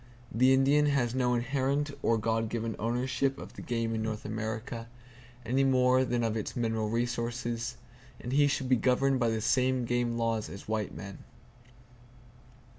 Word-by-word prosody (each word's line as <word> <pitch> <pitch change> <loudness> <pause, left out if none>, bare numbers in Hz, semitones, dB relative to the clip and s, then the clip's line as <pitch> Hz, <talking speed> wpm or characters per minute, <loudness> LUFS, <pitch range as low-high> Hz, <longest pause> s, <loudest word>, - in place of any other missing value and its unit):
The 130 +3 +4
Indian 140 +3 +4
has 130 -5 +1
no 125 -1 +1
inherent 135 +4 0
or 115 -2 +2
God 115 0 0
given 115 -1 -3
ownership 125 +4 0
of - - -9
the - - -9
game 115 -1 -2
of 110 - -1
North 110 -1 -4
America, 110 +2 -4 0.6
anymore 130 0 +3
than 120 -1 0
of 115 -1 0
its 110 - -4
mineral 110 -2 -1
resources; 120 +1 -2 0.4
and 120 - -6
he 145 +1 +4
should 135 -2 -1
be 130 -1 +4
governed 130 +2 +2
by 120 -2 +2
the 110 -1 -1
same 130 +2 +2
game 120 0 0
laws 115 -2 -1
as 100 - -10
white 110 -2 -1
men. 100 -1 -8
120 Hz, 160 wpm, -30 LUFS, 115-130 Hz, 0.6 s, The